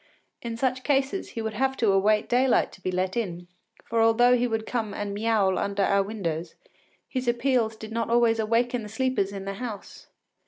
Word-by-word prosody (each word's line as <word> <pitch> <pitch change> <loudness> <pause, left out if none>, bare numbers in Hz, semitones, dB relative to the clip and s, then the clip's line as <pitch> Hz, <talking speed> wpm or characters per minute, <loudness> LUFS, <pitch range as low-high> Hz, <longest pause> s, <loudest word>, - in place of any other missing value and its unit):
In 230 -1 -5
such 255 0 -1
cases 280 +5 0
he 225 - -2
would 220 -1 -3
have 265 +4 0
to 220 -4 +3
await 210 +2 +3
daylight 250 +1 +2
to 190 - -16
be 185 - -2
let 185 +1 -1
in, 175 -7 -3 0.4
for 230 0 0
although 240 +2 +5
he 245 0 +1
would 225 -1 -2
come 220 -4 -3
and 205 -1 -3
miaoul 205 -3 +1
under 200 0 0
our 200 0 +3
windows, 175 -6 -4 0.5
his 255 -2 -4
appeals 240 -2 +1
did 220 0 -9
not 230 0 -2
always 235 -1 +3
awaken 235 +2 +1
the 210 - -8
sleepers 225 -3 0
in 195 -1 -6
the 195 - -3
house. 220 -5 -7
225 Hz, 195 wpm, -26 LUFS, 200-245 Hz, 0.5 s, although